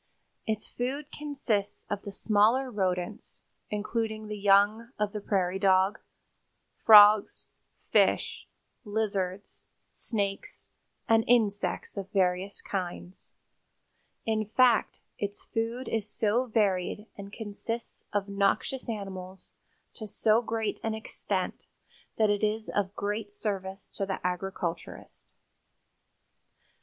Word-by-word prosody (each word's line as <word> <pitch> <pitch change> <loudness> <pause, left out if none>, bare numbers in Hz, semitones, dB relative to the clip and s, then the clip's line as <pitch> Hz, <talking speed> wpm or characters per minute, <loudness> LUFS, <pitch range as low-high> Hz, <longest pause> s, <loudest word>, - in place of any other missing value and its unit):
Its 215 -1 -2
food 275 +4 -4
consists 270 -9 -2
of 205 -1 -3
the 200 - -7
smaller 220 +6 +2
rodents, 185 -1 -2 0.3
including 215 +1 -2
the 210 0 -5
young 205 +3 +4
of 210 -1 -1
the 210 - -4
prairie 190 -2 0
dog, 190 +1 +3 0.8
frogs, 210 -1 +8 0.5
fish, - - +2 0.4
lizards, 205 -3 -3 0.3
snakes 205 - -4 0.4
and 225 0 +5
insects 205 -6 +1
of 195 -1 -4
various 185 0 0
kinds. 180 -1 -5 1.0
In 220 -1 +1
fact, 235 +2 +3 0.2
its 205 0 -4
food 230 +3 -3
is 220 -2 -2
so 220 +4 +1
varied 205 -2 0
and 200 0 -9
consists 225 +2 -5
of 205 -1 -1
noxious 200 +6 0
animals 190 -3 -6 0.4
to 220 - -7
so 215 +2 +3
great 225 -3 -2
an 225 -1 -1
extent 220 - -3 0.5
that 215 -2 +4
it 205 +1 -1
is 215 +1 0
of 200 0 -1
great 205 +1 -3
service 195 -2 -4
to 195 - -3
the 190 - -2
agriculturist. 180 -2 -4
Dr. - - -32
205 Hz, 110 wpm, -29 LUFS, 195-220 Hz, 1.0 s, frogs